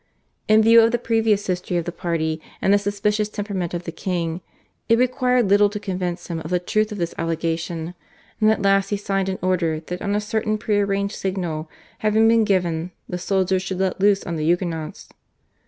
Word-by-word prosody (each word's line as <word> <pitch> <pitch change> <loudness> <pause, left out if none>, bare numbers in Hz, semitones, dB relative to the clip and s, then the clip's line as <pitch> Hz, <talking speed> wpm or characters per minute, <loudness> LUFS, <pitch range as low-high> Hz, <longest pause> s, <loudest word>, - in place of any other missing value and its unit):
In 215 0 +5
view 230 +1 +7
of 225 +1 +4
the 240 - +1
previous 225 -3 +1
history 180 -1 -2
of 170 - -2
the 175 - -3
party 160 -2 -2 0.2
and 195 - +3
the 205 - +5
suspicious 205 +1 -1
temperament 200 -5 -3
of 175 - -4
the 170 - -5
king, 170 -1 -3 0.5
it 230 - +5
required 250 -1 +2
little 205 +1 +5
to 210 0 -5
convince 180 -3 -3
him 170 -2 -4
of 160 - -7
the 180 - +2
truth 215 +4 0
of 210 - -5
this 170 -2 -2
allegation, 165 0 -2 0.5
and 215 -1 +4
at 220 -2 +1
last 195 0 +3
he 205 - 0
signed 195 -1 -1
an 190 - -2
order 170 -4 +1
that 180 +3 -7
on 200 0 -1
a - - +2
certain 215 0 -1
pre 210 -1 0
arranged 200 0 0
signal 175 -5 -3 0.3
having 215 +1 +3
been 225 -1 +4
given 175 -4 0 0.2
the 180 - -4
soldiers 190 0 +1
should 190 -1 -4
let 190 0 -1
loose 200 0 +4
on 170 -1 -4
the 155 - -2
Huguenots. 165 -2 -2
195 Hz, 205 wpm, -22 LUFS, 175-210 Hz, 0.5 s, view